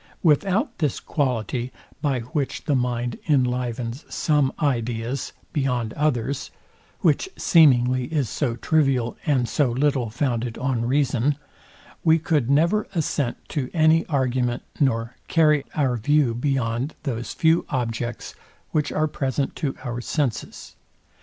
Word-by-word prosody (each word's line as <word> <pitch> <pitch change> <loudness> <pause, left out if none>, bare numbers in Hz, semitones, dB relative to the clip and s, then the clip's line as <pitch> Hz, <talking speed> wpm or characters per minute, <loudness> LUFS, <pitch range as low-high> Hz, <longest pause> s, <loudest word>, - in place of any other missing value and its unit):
Without 185 +6 +2
this 150 -6 0
quality, 125 -3 -1 0.3
by 135 -5 0
which 140 +3 -3
the 150 - +1
mind 125 -2 -1
enlivens 125 -1 0
some 150 -4 +2
ideas 120 -2 -1 0.2
beyond 125 -7 0
others 140 -3 -1 0.5
(which 385 - +2
seemingly 130 -6 +4
is 145 -2 -1
so 125 -2 -1
trivial, 130 -3 +1
and 130 -5 +2
so 145 0 +1
little 130 -1 +1
founded 120 -1 -2
on 125 -2 -1
reason) 135 0 +1 0.7
we 160 -1 +5
could 150 -6 0
never 170 +9 +3
assent 145 -6 -1
to 135 -5 -2
any 160 0 +5
argument, 130 -4 0 0.2
nor 115 -4 +1
carry 150 -3 +4
our 130 -5 +1
view 145 +1 +2
beyond 125 +1 -1
those 120 -5 -4
few 165 +1 +3
objects, 120 -2 -3 0.4
which 150 -2 0
are 155 0 +1
present 135 -1 -2
to 135 -3 -2
our 120 -2 -4
senses. 130 -3 -3
130 Hz, 125 wpm, -24 LUFS, 120-150 Hz, 0.7 s, we